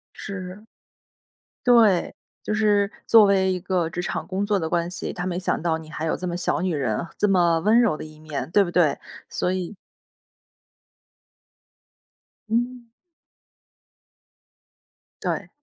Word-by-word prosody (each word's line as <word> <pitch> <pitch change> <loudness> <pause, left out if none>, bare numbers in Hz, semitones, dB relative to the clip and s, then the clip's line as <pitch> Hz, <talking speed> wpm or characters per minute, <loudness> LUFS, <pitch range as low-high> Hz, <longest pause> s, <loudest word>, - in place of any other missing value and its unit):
是。 195 +1 -7 1.0
对， 225 -7 +4 0.3
就 215 - -1
是 205 -2 +2 0.2
作 225 -2 +8
为 190 -1 +3
一 185 - -2
个 180 -2 -1
职 175 - -4
场 175 - -3
工 195 +1 -2
作 205 -1 +2
的 160 -3 -2
关 170 -1 0
系， 180 - -5
他 180 - -4
没 175 -1 -2
想 185 - -1
到 160 -1 0
你 160 -1 -12
还 155 - -5
有 160 - 0
这 180 - -4
么 175 - -3
小 175 - -1
女 185 - 0
人， 125 -5 -1
这 210 - +2
么 175 -4 +3
温 215 +6 +4
柔 230 -10 +2
的 - - -7
一 155 0 -13
面， 150 -3 -5
对 205 - +5
不 175 - -2
对？ 170 -5 +3 0.3
所 180 - -1
以 185 +2 -4 2.7
嗯。 240 +1 -1 2.4
对。 - - -2
185 Hz, 155 characters per minute, -24 LUFS, 170-205 Hz, 2.7 s, 作